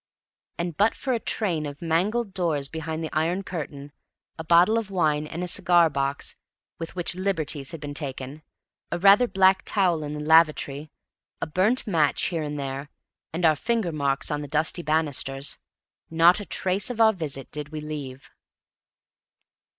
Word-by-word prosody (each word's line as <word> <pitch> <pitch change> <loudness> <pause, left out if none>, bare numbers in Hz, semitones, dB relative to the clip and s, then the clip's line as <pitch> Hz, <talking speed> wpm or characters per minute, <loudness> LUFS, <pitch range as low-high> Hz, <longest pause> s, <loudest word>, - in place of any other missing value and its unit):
And 170 -2 -3
but 210 +7 +2
for 260 - -2
a 235 - 0
train 170 -10 -1
of 145 0 -8
mangled 195 +7 0
doors 165 -7 -1
behind 160 +1 -5
the 160 - -5
iron 170 +5 0
curtain, 145 -5 -7 0.4
a 160 - -7
bottle 175 +7 +4
of 220 -3 -7
wine 155 -5 0
and 170 +3 -5
a - - -3
cigar 170 -2 +4
box 140 0 -2 0.4
with 165 +2 -7
which 175 -1 -2
liberties 165 -7 -1
had 165 - -6
been 145 -1 -6
taken, 140 0 -6 0.5
a 170 - -1
rather 200 +6 +6
black 190 -2 +4
towel 180 -6 +2
in 150 0 -5
the - - -5
lavatory, 155 -2 +3 0.5
a - - -1
burnt 190 +10 +1
match 160 -8 +1
here 170 -3 -2
and 150 -1 -4
there, 135 +1 -5 0.4
and 170 +2 -1
our 155 -1 +5
finger 220 0 -1
marks 140 -2 -1
on 150 0 -2
the 145 - -6
dusty 155 +4 +1
banisters, 145 -3 -1 0.5
not 165 +4 +5
a 205 - -7
trace 190 +3 -1
of 245 -2 -5
our 220 -1 +6
visit 145 - -6
did 150 -1 -5
we 155 0 -6
leave. 145 -4 -7
160 Hz, 170 wpm, -25 LUFS, 150-185 Hz, 0.5 s, rather